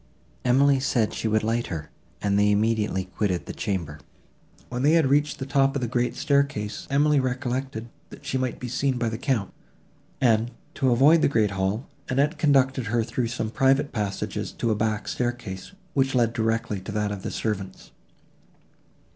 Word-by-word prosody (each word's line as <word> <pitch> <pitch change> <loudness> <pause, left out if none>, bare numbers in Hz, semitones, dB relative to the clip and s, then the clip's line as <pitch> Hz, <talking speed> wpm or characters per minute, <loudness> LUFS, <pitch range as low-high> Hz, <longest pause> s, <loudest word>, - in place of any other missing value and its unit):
Emily 135 +2 +4
said 125 -5 +1
she - - -2
would 110 0 +1
light 115 +2 0
her, 80 -4 -6 0.3
and 100 0 +2
they 105 0 +4
immediately 105 -2 +1
quitted 95 -1 -2
the - - -6
chamber. 85 -8 -3 0.7
When 125 0 -4
they 145 +4 +4
had 160 -5 +4
reached 145 +1 +2
the 135 - -4
top 135 0 +2
of 140 - -1
the - - 0
great 120 +1 0
staircase, 140 -8 0
Emily 145 +1 +3
recollected, 130 -2 -2 0.2
that - - -13
she 130 - -1
might 130 -2 -2
be 125 - -5
seen 130 +2 0
by 120 -1 0
the 110 0 -5
Count, 125 -8 -1 0.7
and, 115 -2 +3 0.2
to 135 -2 +1
avoid 140 +7 +5
the - - +4
great 110 -7 +2
hall, 100 +6 -1 0.2
Annette 140 +6 +1
conducted 135 -4 +3
her 115 +2 +1
through 120 +1 -2
some 115 -2 -3
private 135 +2 +2
passages 105 -4 -3
to 115 - -1
a - - +2
back 110 0 -1
staircase, 120 - -3 0.2
which 135 -1 +1
led 115 -2 +3
directly 115 -3 -1
to 95 - -7
that 105 0 -1
of 100 -2 -5
the - - -4
servants. 100 -4 -4
120 Hz, 180 wpm, -25 LUFS, 105-135 Hz, 0.7 s, avoid